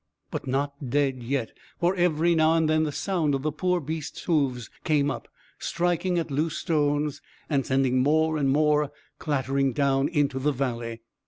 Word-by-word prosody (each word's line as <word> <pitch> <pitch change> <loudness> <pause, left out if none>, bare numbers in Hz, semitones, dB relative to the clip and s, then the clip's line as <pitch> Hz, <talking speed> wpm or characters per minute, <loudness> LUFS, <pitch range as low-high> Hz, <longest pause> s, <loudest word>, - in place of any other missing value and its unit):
But - - -4
not 140 0 -2
dead 135 -1 +1
yet, 125 -1 -2 0.3
for 175 +2 +2
every 170 -1 +2
now 160 0 +4
and 160 -1 +2
then 155 0 +2
the 150 - -2
sound 160 -3 0
of 135 - -3
the 155 - 0
poor 180 +4 0
beast's 155 0 -5
hoofs 135 -8 0 0.2
came 145 -3 +2
up, - - -6 0.3
striking 175 +1 0
at 165 -2 -2
loose 155 +3 0
stones 150 -3 0 0.3
and 140 -2 +2
sending 130 -1 +2
more 155 +3 +2
and 140 -2 +1
more 150 0 +3 0.3
clattering 135 -2 0
down 135 +1 +2
into 145 -4 0
the 150 +3 +1
valley. 115 -3 -3
145 Hz, 170 wpm, -26 LUFS, 135-160 Hz, 0.3 s, now